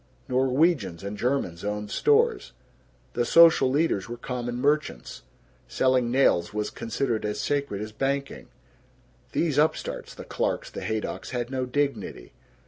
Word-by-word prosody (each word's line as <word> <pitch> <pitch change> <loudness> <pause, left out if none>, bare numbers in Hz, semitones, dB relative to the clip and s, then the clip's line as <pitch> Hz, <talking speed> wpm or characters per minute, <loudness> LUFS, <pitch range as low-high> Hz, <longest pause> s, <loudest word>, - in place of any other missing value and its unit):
Norwegians 130 - +1
and 100 +1 -4
Germans 105 -8 -1
owned 105 0 -3
stores. 450 +1 +2 0.6
The - - +1
social 165 -5 +6
leaders 135 - 0
were 120 - -5
common 120 0 -4
merchants. 145 - -1 0.5
Selling 130 -2 +2
nails 110 -8 +2
was 105 -1 -2
considered 115 0 -2
as 105 0 -2
sacred 140 -8 -1
as 110 - -7
banking. 140 +4 -3 0.9
These 150 -4 +1
upstarts 155 +1 -1
the - - -9
Clarks, - - -2
the - - -7
Haydocks 110 -1 -3
had 120 0 -3
no 130 -1 -2
dignity. 140 - -2
125 Hz, 135 wpm, -26 LUFS, 105-140 Hz, 0.9 s, social